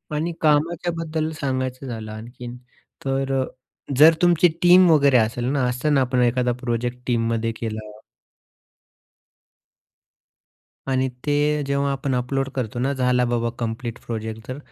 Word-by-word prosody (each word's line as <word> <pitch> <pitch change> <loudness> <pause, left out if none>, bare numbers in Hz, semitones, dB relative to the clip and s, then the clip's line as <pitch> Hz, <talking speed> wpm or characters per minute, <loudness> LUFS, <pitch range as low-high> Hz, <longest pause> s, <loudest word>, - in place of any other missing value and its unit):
आणि 165 +3 -1
कामाच्याबद्दल 160 +1 0
सांगायचं 130 -1 -2
झालं 110 -3 -6
आणखीन 120 +3 -9 0.5
तर 135 0 -1
अ, - - -1 0.5
जर 155 +3 +8
तुमची 175 0 +5
टीम 180 0 +7
वगैरे 140 -4 +5
असेल 120 +1 0
ना 140 -2 0
असंत 125 +5 -1
ना, 135 - +4
आपण 125 -1 +1
एखादा 125 +1 +2
प्रोजेक्ट 120 0 -2
टीममध्ये 115 -1 0
केला 110 -1 -4 3.0
आणि 130 0 +1 0.2
ते 150 +1 +1
जेव्हा 140 0 0
आपण 135 -1 -2
अपलोड 135 +2 -1
करतो 120 -3 -3
ना, 135 +3 0
झाला 125 -2 +2
बाबा 120 -1 0
कंप्लीट 115 0 -4
प्रोजेक्ट 110 -1 -5
तर 130 +2 -5
130 Hz, 130 wpm, -22 LUFS, 120-145 Hz, 3.0 s, जर